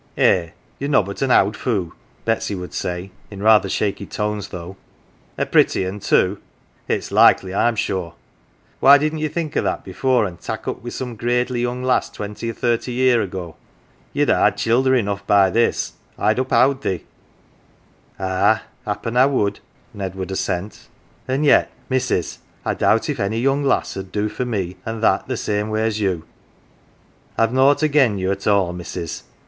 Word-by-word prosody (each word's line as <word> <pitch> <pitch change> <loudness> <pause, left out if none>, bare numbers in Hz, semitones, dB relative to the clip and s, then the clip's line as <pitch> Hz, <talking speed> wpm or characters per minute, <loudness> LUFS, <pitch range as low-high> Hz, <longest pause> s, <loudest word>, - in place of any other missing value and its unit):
" - - -32
Eh, 85 -3 +3 0.3
ye're 140 - -2
nobbut 100 -8 +1
an 135 - +1
owd 105 -4 +4
foo'," 100 -10 -2 0.3
Betsy 115 -2 0
would 90 -1 -7
say, 90 +2 -4 0.2
in 100 -1 -8
rather 110 -1 +5
shaky 100 -2 -2
tones 105 -1 -3
though. 90 +2 -8 0.3
" - - -34
A - - 0
pretty 95 - +3
un, 95 +3 -5
too! 100 0 +2 0.5
It's - - -2
likely, 95 -1 +5
I'm 120 +4 +2
sure? 95 -5 -2 0.6
Why 140 +1 +8
didn't 155 +2 -1
ye 155 - 0
think 155 0 -4
o' - - +2
that - - -2
before, 130 -4 +1
an' 90 -3 -6
tak' - - -6
up - - -2
wi' 120 - -5
some 125 -1 -5
gradely 120 +2 0
young 125 +1 -2
lass 130 0 +1
twenty 105 +2 -6
or - - -3
thirty 120 +2 -1
year 125 -2 +3
ago? 90 -5 -6 0.5
Ye'd - - +1
ha' - - +2
had - - +2
childer 130 +3 +2
enough 100 -4 -1
by 100 -2 +5
this, 115 +4 +1 0.2
I'll 110 - +2
uphowd 130 +2 +2
ye." 95 -3 -2 0.6
" - - -34
Ah, 95 +4 +2 0.2
happen 115 +3 -3
I 130 +2 +6
would," 105 -8 0 0.3
Ned 95 -2 -5
would 95 0 -5
assent; 95 +1 -3 0.2
" - - -34
an' 135 +3 0
yet, 145 - +5 0.2
missus, 130 -9 -1 0.3
I - - +1
doubt - - +2
if - - -3
any 100 +3 -1
young 135 +3 +1
lass 135 - 0
'ud 95 -1 -7
do 105 0 -1
for 110 +4 -3
me 95 -6 -3
an' 110 0 -5
that 125 +2 +1
same 105 0 -1
way 110 0 0
as 110 -1 -1
you. 90 -6 -1 1.1
I've 115 +1 +2
nought 140 +3 +4
again 140 -8 +3
you 95 0 -1
at 100 0 -4
all, 100 -4 +2
missus. 85 -2 -6
105 Hz, 180 wpm, -21 LUFS, 95-125 Hz, 1.1 s, Why